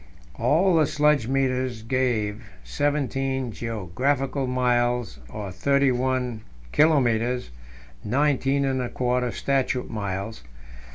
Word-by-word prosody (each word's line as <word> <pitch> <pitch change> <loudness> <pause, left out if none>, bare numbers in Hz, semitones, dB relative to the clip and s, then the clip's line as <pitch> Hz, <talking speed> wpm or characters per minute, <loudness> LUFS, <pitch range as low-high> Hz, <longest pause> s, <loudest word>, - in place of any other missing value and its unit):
All 175 +4 +3
the 155 -2 +4
sledge 150 -5 +2
meters 130 -3 0
gave 115 -3 -1 0.2
seventeen 135 -3 -1
geographical 125 - -1
miles, 125 -1 0
or 105 -3 -6
thirty 140 +7 +2
one 125 -2 -1 0.3
kilometres 125 - +2 0.5
(nineteen 140 +2 +1
and 130 -1 0
a 125 - -3
quarter 125 0 0
statute 135 -2 -1
miles). 100 - -4
125 Hz, 100 wpm, -25 LUFS, 120-135 Hz, 0.5 s, the